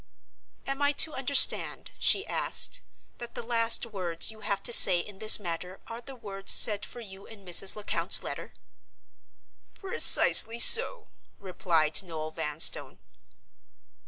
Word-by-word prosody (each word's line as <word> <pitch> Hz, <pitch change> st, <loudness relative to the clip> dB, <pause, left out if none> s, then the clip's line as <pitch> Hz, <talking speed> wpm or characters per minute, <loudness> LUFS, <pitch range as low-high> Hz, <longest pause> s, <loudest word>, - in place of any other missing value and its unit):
"Am 275 Hz, +1 st, -8 dB
I 285 Hz, 0 st, -3 dB
to 310 Hz, +2 st, 0 dB
understand," 270 Hz, 0 st, +1 dB
she -, -, -1 dB
asked, -, -, -3 dB, 0.4 s
"that 240 Hz, 0 st, -12 dB
the -, -, -10 dB
last 230 Hz, 0 st, -3 dB
words 185 Hz, -5 st, -4 dB
you 220 Hz, -, -19 dB
have 200 Hz, -2 st, -8 dB
to 240 Hz, -, -1 dB
say 180 Hz, -, +6 dB
in 190 Hz, +3 st, -11 dB
this 215 Hz, 0 st, +4 dB
matter 180 Hz, 0 st, -10 dB
are 230 Hz, +1 st, -13 dB
the 265 Hz, +2 st, -15 dB
words 200 Hz, -5 st, -1 dB
said 210 Hz, -1 st, +2 dB
for 240 Hz, -, -13 dB
you 195 Hz, -3 st, -16 dB
in 205 Hz, -3 st, -19 dB
Mrs. 185 Hz, +2 st, +1 dB
Lecount's 210 Hz, -1 st, -1 dB
letter!" -, -, -11 dB, 1.2 s
"Precisely 375 Hz, -, +3 dB
so," 460 Hz, -, +4 dB, 0.3 s
replied 170 Hz, -4 st, -4 dB
Noel 160 Hz, -4 st, -11 dB
Vanstone. 155 Hz, -1 st, -3 dB
210 Hz, 135 wpm, -23 LUFS, 180-240 Hz, 1.2 s, say